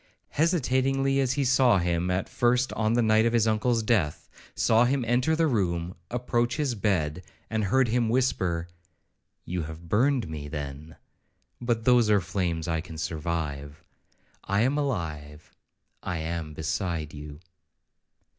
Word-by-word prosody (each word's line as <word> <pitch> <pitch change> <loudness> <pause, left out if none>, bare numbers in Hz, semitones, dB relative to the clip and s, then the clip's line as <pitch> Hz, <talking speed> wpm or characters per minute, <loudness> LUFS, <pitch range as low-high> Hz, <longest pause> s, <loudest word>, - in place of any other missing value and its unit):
—hesitatingly 135 -4 +1
as 130 -2 +1
he 140 0 0
saw 125 -4 +4
him 85 0 0
at 90 +1 -1
first 125 +1 +1
on 110 0 0
the 120 0 +3
night 110 0 +4
of 115 - 0
his 115 -1 +3
uncle's 115 +1 +1
death,—saw 110 +3 +1
him 130 0 0
enter 125 +7 +2
the 165 0 +2
room, 90 - -1
approach 120 0 0
his 145 -5 0
bed, 90 -7 0 0.3
and 110 -2 0
heard 130 +6 +3
him 115 0 +1
whisper, 95 -9 0 0.8
'You 90 0 -3
have 80 +2 -8
burned 125 +3 +2
me, 75 -2 -6
then; 75 +1 -7 0.7
but 120 -2 -1
those 125 -3 +5
are 105 -1 +5
flames 85 -2 -2
I 80 -1 0
can 80 -2 -10
survive.—I 80 +4 -5
am 130 +5 +2
alive,—I 80 - -5
am 80 -1 -4
beside 80 -1 -3
you.' 75 0 -9
105 Hz, 135 wpm, -27 LUFS, 80-125 Hz, 0.8 s, those